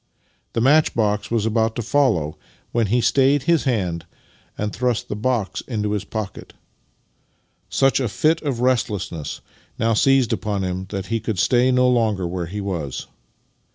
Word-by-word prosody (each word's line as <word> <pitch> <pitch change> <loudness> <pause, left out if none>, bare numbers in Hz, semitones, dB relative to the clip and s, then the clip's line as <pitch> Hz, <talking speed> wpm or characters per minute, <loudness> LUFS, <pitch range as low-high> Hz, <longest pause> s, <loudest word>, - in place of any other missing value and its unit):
The 115 - 0
match 150 +5 +4
box 105 -2 0
was 115 -2 0
about 110 0 +1
to 120 - -3
follow 110 - +2
it, 75 - -13 0.4
when 115 -2 +1
he 120 +5 +2
stayed 135 +4 +3
his 170 -3 +2
hand, 90 -10 -1 0.5
and 105 0 -2
thrust 125 -2 -1
the - - -2
box 110 -2 -1
into 105 -4 -2
his 105 -2 -2
pocket. 110 -3 -6 1.2
Such 135 0 +3
a 125 -4 -1
fit 155 +11 +1
of 135 -6 -2
restlessness 105 - -1 0.4
now 115 0 +1
seized 135 +1 +3
upon 100 -3 -2
him 95 0 -3
that 95 -1 -4
he 115 - +1
could 110 -2 -3
stay 125 +6 +3
no 125 0 +4
longer 110 -6 +1
where 85 -1 -3
he 100 +4 -5
was. 85 -9 -4
110 Hz, 165 wpm, -22 LUFS, 100-125 Hz, 1.2 s, match